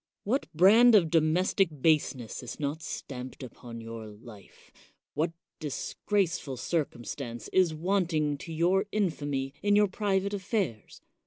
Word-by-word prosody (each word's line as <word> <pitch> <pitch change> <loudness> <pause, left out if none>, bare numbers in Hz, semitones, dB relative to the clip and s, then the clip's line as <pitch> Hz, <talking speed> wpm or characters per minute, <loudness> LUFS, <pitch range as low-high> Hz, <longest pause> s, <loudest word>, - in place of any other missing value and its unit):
What 255 +7 0
brand 215 +8 +7
of 170 -6 +4
domestic 170 +4 +3
baseness 140 -7 +1
is 125 - -8
not 150 +2 -2
stamped 130 -3 -7
upon 120 -1 -9
your 115 -1 -7
life? 105 -1 -14 0.4
What 160 +3 0 0.3
disgraceful 155 -1 -2
circumstance 120 -4 -3
is 180 -4 +3
wanting 160 -4 0
to 165 - -8
your 180 +5 +2
infamy 145 -9 -1
in 205 0 +3
your 210 0 +5
private 200 0 -1
affairs 190 - -3
160 Hz, 125 wpm, -29 LUFS, 130-190 Hz, 0.4 s, brand